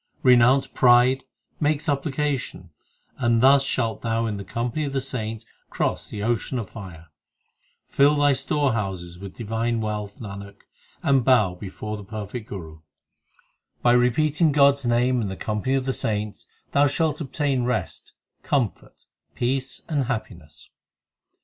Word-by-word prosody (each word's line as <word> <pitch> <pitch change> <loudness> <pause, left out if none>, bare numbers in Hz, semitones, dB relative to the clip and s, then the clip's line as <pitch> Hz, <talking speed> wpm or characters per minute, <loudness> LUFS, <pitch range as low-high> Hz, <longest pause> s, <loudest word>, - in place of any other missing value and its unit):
Renounce 125 +1 +5
pride, 125 +1 +4 0.3
make 150 0 +2
supplication, 140 - -2 0.5
And 120 -2 +2
thus 135 +3 +6
shalt 115 -5 -1
thou 115 0 0
in 105 -2 -2
the 100 - -6
company 120 +8 -3
of 140 - -4
the 135 - +1
saints 115 -4 -4 0.2
cross - - -2
the 105 - -5
ocean 120 +3 -1
of 115 -5 -5
fire. 90 -6 -10 0.8
Fill 145 +2 +3
thy 145 -1 +4
storehouses 105 - -1
with 100 -1 -9
divine 115 +1 -1
wealth, 105 -2 -4
Nanak, 100 -2 -9 0.4
and 135 -3 +3
bow 110 -8 +4
before 105 +3 -6
the 105 - -9
perfect 110 +2 -7
Guru. 80 -5 -8
2 - - -26 1.0
By 120 - +5
repeating 150 +6 +3
God 140 -1 +6
s 140 -2 -7
name 120 +1 +2
in 105 - -2
the 95 - -5
company 110 +5 -1
of 135 -1 -1
the 135 - 0
saints, 105 -3 -3 0.2
Thou 145 +1 +4
shalt 155 +2 0
obtain 140 -2 -1
rest, 125 -1 -3 0.3
comfort, 125 -7 -2 0.3
peace, 130 +2 -2
and 145 -4 0
happiness. 85 - -6
120 Hz, 145 wpm, -24 LUFS, 105-135 Hz, 1.0 s, thus